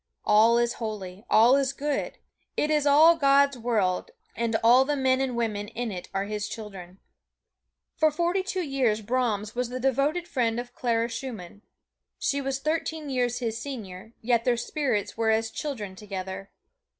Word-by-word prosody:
All 220 Hz, +3 st, +5 dB
is 240 Hz, 0 st, +1 dB
holy, 205 Hz, -3 st, -5 dB
all 235 Hz, +4 st, +6 dB
is 275 Hz, -1 st, 0 dB
good 285 Hz, 0 st, -3 dB, 0.4 s
it 300 Hz, -, +1 dB
is 300 Hz, -1 st, +2 dB
all 310 Hz, +4 st, +7 dB
God's 280 Hz, -2 st, +4 dB
world, 225 Hz, -, 0 dB, 0.3 s
and 230 Hz, -1 st, -1 dB
all 245 Hz, +3 st, +7 dB
the 295 Hz, +2 st, -1 dB
men 260 Hz, -1 st, +2 dB
and 260 Hz, -2 st, -1 dB
women 215 Hz, -3 st, -2 dB
in 230 Hz, +1 st, -4 dB
it 180 Hz, -2 st, -7 dB
are 195 Hz, 0 st, -1 dB
His 210 Hz, 0 st, -4 dB
children. 195 Hz, -5 st, -9 dB, 1.0 s
For 315 Hz, -, +4 dB
forty 345 Hz, +5 st, 0 dB
two 375 Hz, -1 st, -3 dB
years 260 Hz, -7 st, 0 dB
Brahms 220 Hz, -3 st, -1 dB
was 245 Hz, -1 st, -2 dB
the 255 Hz, +1 st, -4 dB
devoted 275 Hz, +7 st, 0 dB
friend 240 Hz, -7 st, 0 dB
of 245 Hz, 0 st, -7 dB
Clara 230 Hz, -2 st, 0 dB
Schumann. 230 Hz, -6 st, -7 dB, 0.6 s
She 280 Hz, 0 st, -1 dB
was 270 Hz, -1 st, -2 dB
thirteen 310 Hz, 0 st, -2 dB
years 245 Hz, -2 st, 0 dB
his 230 Hz, -2 st, -3 dB
senior, 220 Hz, -6 st, -8 dB
yet 235 Hz, 0 st, +2 dB
their 245 Hz, -1 st, +2 dB
spirits 240 Hz, -4 st, -2 dB
were 225 Hz, -1 st, +1 dB
as 220 Hz, 0 st, +1 dB
children 215 Hz, -10 st, -5 dB
together. 195 Hz, -1 st, -6 dB
240 Hz, 165 wpm, -26 LUFS, 215-275 Hz, 1.0 s, all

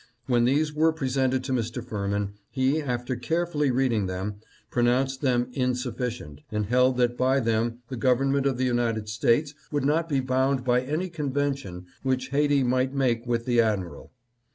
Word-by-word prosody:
When 120 Hz, -2 st, +2 dB
these 150 Hz, +4 st, +2 dB
were 160 Hz, +2 st, +3 dB
presented 130 Hz, -3 st, 0 dB
to 130 Hz, -, -4 dB
Mr. 120 Hz, 0 st, -2 dB
Firmin, 100 Hz, -2 st, -2 dB, 0.2 s
he, 135 Hz, +4 st, +1 dB
after 125 Hz, -2 st, -2 dB
carefully 150 Hz, +3 st, 0 dB
reading 120 Hz, -6 st, +1 dB
them, 95 Hz, +3 st, -4 dB, 0.3 s
pronounced 130 Hz, +2 st, +1 dB
them 125 Hz, -3 st, +1 dB
insufficient, 125 Hz, -, -3 dB
and 105 Hz, -1 st, -1 dB
held 125 Hz, +3 st, +3 dB
that 120 Hz, -1 st, +2 dB
by 130 Hz, +2 st, +2 dB
them 115 Hz, 0 st, -1 dB
the 130 Hz, -, -5 dB
government 135 Hz, +2 st, +2 dB
of 130 Hz, -3 st, 0 dB
the 130 Hz, -, +1 dB
United 115 Hz, -3 st, 0 dB
States 120 Hz, +7 st, +1 dB, 0.2 s
would 145 Hz, -2 st, 0 dB
not 160 Hz, +3 st, +1 dB
be 140 Hz, -3 st, +1 dB
bound 130 Hz, 0 st, +1 dB
by 125 Hz, 0 st, +2 dB
any 155 Hz, +8 st, -2 dB
convention 140 Hz, -, -3 dB, 0.2 s
which 130 Hz, -1 st, -1 dB
Haiti 145 Hz, 0 st, +2 dB
might 130 Hz, +2 st, +1 dB
make 120 Hz, -3 st, 0 dB
with 115 Hz, -1 st, 0 dB
the 120 Hz, -2 st, +4 dB
admiral. 100 Hz, -6 st, -2 dB
125 Hz, 165 wpm, -26 LUFS, 120-135 Hz, 0.3 s, the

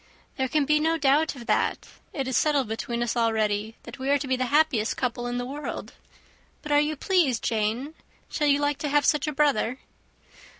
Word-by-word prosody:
"There 265 Hz, -1 st, -1 dB
can 295 Hz, +2 st, +1 dB
be 300 Hz, +1 st, +3 dB
no 325 Hz, +2 st, +1 dB
doubt 295 Hz, +1 st, +2 dB
of 240 Hz, -3 st, -10 dB
that. -, -, 0 dB, 0.2 s
It 270 Hz, -3 st, -3 dB
is 260 Hz, -, -2 dB
settled 290 Hz, -5 st, +2 dB
between 235 Hz, +2 st, -3 dB
us 240 Hz, -, -2 dB
already 220 Hz, -2 st, 0 dB
that -, -, -10 dB
we 265 Hz, +1 st, -3 dB
are 285 Hz, -, +4 dB
to 280 Hz, -1 st, -5 dB
be 260 Hz, -, +1 dB
the 255 Hz, 0 st, -1 dB
happiest 285 Hz, -6 st, +2 dB
couple 245 Hz, -1 st, -2 dB
in 245 Hz, 0 st, -3 dB
the 245 Hz, -, -3 dB
world. 285 Hz, +4 st, -6 dB, 0.7 s
But 300 Hz, -, -6 dB
are 290 Hz, -, +5 dB
you 300 Hz, +1 st, 0 dB
pleased, 305 Hz, -6 st, +1 dB
Jane? 225 Hz, +7 st, -1 dB, 0.3 s
Shall 300 Hz, -, -1 dB
you 285 Hz, -1 st, +4 dB
like 290 Hz, -1 st, 0 dB
to 295 Hz, -, -2 dB
have 290 Hz, 0 st, +2 dB
such 300 Hz, -1 st, +2 dB
a -, -, 0 dB
brother?" 275 Hz, -4 st, +1 dB
270 Hz, 210 wpm, -26 LUFS, 240-295 Hz, 0.7 s, are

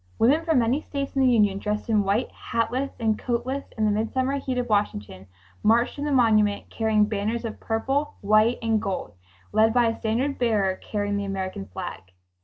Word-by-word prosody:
Women 285 Hz, +8 st, +3 dB
from 325 Hz, -3 st, +2 dB
many 245 Hz, +5 st, +2 dB
states 280 Hz, -2 st, -5 dB
in 270 Hz, -, +2 dB
the 260 Hz, -, +5 dB
Union, 205 Hz, -4 st, +3 dB
dressed 210 Hz, +1 st, -3 dB
in 215 Hz, -2 st, +3 dB
white, 200 Hz, +5 st, 0 dB
hatless 255 Hz, +4 st, -2 dB
and 220 Hz, -2 st, 0 dB
coatless 255 Hz, +3 st, -2 dB
in 220 Hz, -, +1 dB
the 210 Hz, -, +3 dB
midsummer 260 Hz, +6 st, 0 dB
heat 260 Hz, -2 st, -3 dB
of 245 Hz, -1 st, -1 dB
Washington, 105 Hz, -, -2 dB, 0.3 s
marched 235 Hz, +5 st, +2 dB
t0 290 Hz, -, -2 dB
the 295 Hz, -, -1 dB
monument 215 Hz, -5 st, +2 dB
carrying 220 Hz, -2 st, +2 dB
banners 215 Hz, +3 st, -2 dB
of 220 Hz, -, -6 dB
purple, 270 Hz, +6 st, -1 dB
white 215 Hz, +3 st, +3 dB
and 225 Hz, -2 st, +1 dB
gold, 185 Hz, -, -4 dB, 0.4 s
led 220 Hz, +2 st, +3 dB
by 245 Hz, -1 st, +5 dB
a 225 Hz, -, -4 dB
standard 245 Hz, +6 st, -1 dB
bearer 210 Hz, -6 st, +1 dB
carrying 205 Hz, -1 st, -3 dB
the 200 Hz, -, -2 dB
American 190 Hz, -, -4 dB
flag. 95 Hz, 0 st, -6 dB
225 Hz, 190 wpm, -25 LUFS, 205-250 Hz, 0.4 s, the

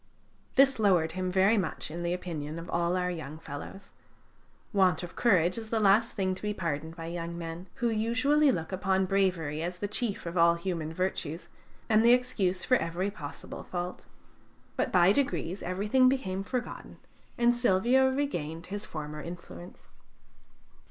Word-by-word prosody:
This 270 Hz, -2 st, +5 dB
lowered 180 Hz, -6 st, +3 dB
him 185 Hz, 0 st, -2 dB
very 195 Hz, +4 st, +4 dB
much 160 Hz, -4 st, -3 dB
in 170 Hz, +2 st, -5 dB
the 170 Hz, 0 st, -1 dB
opinion 165 Hz, -4 st, -4 dB
of 170 Hz, +1 st, -7 dB
all 170 Hz, +1 st, +1 dB
our 180 Hz, 0 st, 0 dB
young 155 Hz, -3 st, -6 dB
fellows. 165 Hz, +6 st, -9 dB, 0.8 s
Want 185 Hz, -4 st, +3 dB
of 175 Hz, -, -8 dB
courage 185 Hz, -4 st, +3 dB
is 220 Hz, -1 st, -9 dB
the 225 Hz, -, +1 dB
last 210 Hz, +2 st, +4 dB
thing 190 Hz, -2 st, 0 dB
to 185 Hz, -, -8 dB
be 210 Hz, 0 st, -2 dB
pardoned 160 Hz, -2 st, -3 dB
by 165 Hz, -1 st, -7 dB
young 170 Hz, 0 st, -5 dB
men, 170 Hz, +2 st, -6 dB
who 240 Hz, 0 st, 0 dB
usually 250 Hz, +7 st, +3 dB
look 165 Hz, -7 st, -3 dB
upon 190 Hz, 0 st, +1 dB
bravery 180 Hz, -6 st, 0 dB
as 175 Hz, +2 st, -3 dB
the 205 Hz, -, -3 dB
chief 210 Hz, -1 st, -1 dB
of 170 Hz, +1 st, -2 dB
all 170 Hz, 0 st, +6 dB
human 170 Hz, -3 st, -3 dB
virtues, 170 Hz, -2 st, -3 dB, 0.4 s
and 220 Hz, 0 st, +4 dB
the 235 Hz, +1 st, +7 dB
excuse 210 Hz, -8 st, 0 dB
for 255 Hz, -, +4 dB
every 180 Hz, +3 st, -2 dB
possible 150 Hz, -8 st, -8 dB
fault. 180 Hz, 0 st, -5 dB, 0.7 s
But, -, -, -1 dB
by 180 Hz, 0 st, +5 dB
degrees, 205 Hz, -8 st, -1 dB
everything 210 Hz, +8 st, +3 dB
became 195 Hz, -8 st, -1 dB
forgotten, 245 Hz, +4 st, -5 dB, 0.4 s
and 240 Hz, 0 st, +4 dB
Silvio 240 Hz, +3 st, +3 dB
regained 170 Hz, -, -3 dB
his 205 Hz, +1 st, -4 dB
former 150 Hz, -1 st, -6 dB
influence. 150 Hz, -, -10 dB
185 Hz, 165 wpm, -29 LUFS, 170-215 Hz, 0.8 s, the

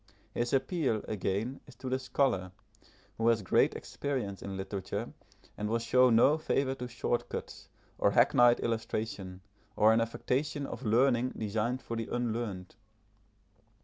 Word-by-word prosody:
His 120 Hz, 0 st, -1 dB
appeal, 135 Hz, -, 0 dB
again, 105 Hz, +5 st, -2 dB
is 135 Hz, -, -14 dB
to 130 Hz, -, -8 dB
the 130 Hz, +1 st, 0 dB
scholar, 125 Hz, -8 st, 0 dB, 0.7 s
who 115 Hz, -, +2 dB
has 115 Hz, -3 st, +3 dB
great -, -, +3 dB
experience 125 Hz, -9 st, -4 dB
in 95 Hz, -1 st, -5 dB
literature, 95 Hz, 0 st, -4 dB, 0.4 s
and 105 Hz, 0 st, -3 dB
will 115 Hz, -, +2 dB
show 125 Hz, +2 st, +4 dB
no 130 Hz, +7 st, +5 dB
favour 135 Hz, -3 st, 0 dB
to 125 Hz, -2 st, -6 dB
short 120 Hz, 0 st, -2 dB
cuts, -, -, -7 dB, 0.3 s
or -, -, +4 dB
hackneyed 120 Hz, -1 st, +5 dB
illustration, 110 Hz, -5 st, -3 dB, 0.3 s
or 110 Hz, +1 st, +5 dB
an 115 Hz, -, +3 dB
affectation 140 Hz, +5 st, -1 dB
of 120 Hz, -, -7 dB
learning 125 Hz, +1 st, +2 dB
designed 110 Hz, +4 st, -2 dB
for 115 Hz, -, -4 dB
the 115 Hz, -1 st, -3 dB
unlearned. 115 Hz, -6 st, -3 dB
115 Hz, 145 wpm, -31 LUFS, 105-130 Hz, 0.7 s, no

